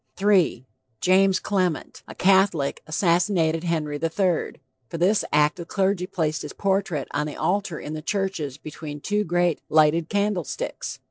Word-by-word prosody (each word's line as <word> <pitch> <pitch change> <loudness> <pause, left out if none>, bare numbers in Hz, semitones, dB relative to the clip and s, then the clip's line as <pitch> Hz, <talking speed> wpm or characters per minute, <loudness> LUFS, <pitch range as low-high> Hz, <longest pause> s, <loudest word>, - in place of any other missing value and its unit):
III. 190 - +3 0.3
JAMES 190 +1 +4
CLEMENT, 185 -5 -2
a - - -10
Catholic, 190 -6 +2
assassinated 170 0 +1
Henry 155 -3 -1
III. 175 +1 0 0.4
For - - -5
this 195 +5 +2
act 150 +1 +3
the 170 - -6
clergy 190 0 0
placed 160 -5 -1
his 150 - -7
portrait 190 -7 -1
on 150 +1 -1
the 150 - -6
altar 190 -4 -1
in 150 - -6
the 155 - -5
churches 190 -7 -2
between 150 -1 -8
two 210 +7 0
great 175 -2 +1
lighted 155 +1 +3
candle 205 -3 0
sticks. - - -5
175 Hz, 150 wpm, -24 LUFS, 155-195 Hz, 0.4 s, JAMES